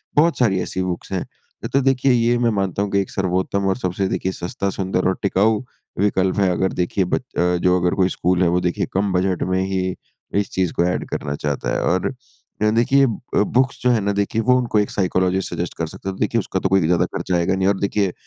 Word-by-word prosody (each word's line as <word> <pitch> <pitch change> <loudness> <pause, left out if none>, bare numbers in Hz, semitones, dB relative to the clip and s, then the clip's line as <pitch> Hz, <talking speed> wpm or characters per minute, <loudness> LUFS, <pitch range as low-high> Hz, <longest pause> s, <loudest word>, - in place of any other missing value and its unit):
बहुत 165 +3 +4
सारी 105 -7 +3
ऐसी 95 - -3
बुक्स 90 +1 -4
हैं। 95 -2 -2 0.5
तो 135 - +4
देखिए, 135 0 +2
ये 120 0 +3
मैं 120 -1 +2
मानता 100 -2 -1
हूँ 100 - -4
कि 100 - +2
एक 95 - -5
सर्वोत्तम 95 +1 -1
और 95 - 0
सबसे 95 -3 -1
देखिए 95 - -1
सस्ता 95 +2 -3
सुंदर 95 -1 -1
और 95 - 0
टिकाऊ 105 +2 +2 0.4
विकल्प 95 -1 +1
है 95 -2 +3
अगर 95 +1 0
देखिए 90 +2 0
ब 90 - 0
अ, - - -6 0.4
जो 90 +1 +2
अगर 90 0 +1
कोई 95 -1 +2
स्कूल 90 0 0
है - - +3
वो 90 +1 +2
देखिए 90 -1 0
कम 100 +1 +1
बजट 90 -1 +1
में 95 - +2
ही 95 -1 -1 0.4
इस 100 - -2
चीज़ 95 -2 0
को - - +1
एड 90 - -1
करना 70 - -3
चाहता 70 -1 -3
है - - 0
और 90 +1 +1 0.5
अ, 105 - +4
देखिए 125 +5 +4
अ, - - +2 0.5
बुक्स 130 +1 +2
जो 125 - +4
है 120 - +3
ना 100 +1 0
देखिए 100 +3 0
वो 125 +3 +4
उनको 120 -4 +1
एक 105 - 0
साइकोलॉजिस्ट 95 -1 0
सजेस्ट 85 -1 -3
कर 85 - -2
सकता 95 - -7
है। - - -3
तो - - -14
देखिए 115 +2 +1
उसका 95 -2 -2
तो 95 - -1
कोई 95 0 +4
ज़्यादा 85 0 +3
खर्चा 90 - -1
आएगा 85 +2 +1
नहीं 95 0 +1
और 100 -1 +1
देखिए 100 -2 0
95 Hz, 240 wpm, -21 LUFS, 90-105 Hz, 0.5 s, बहुत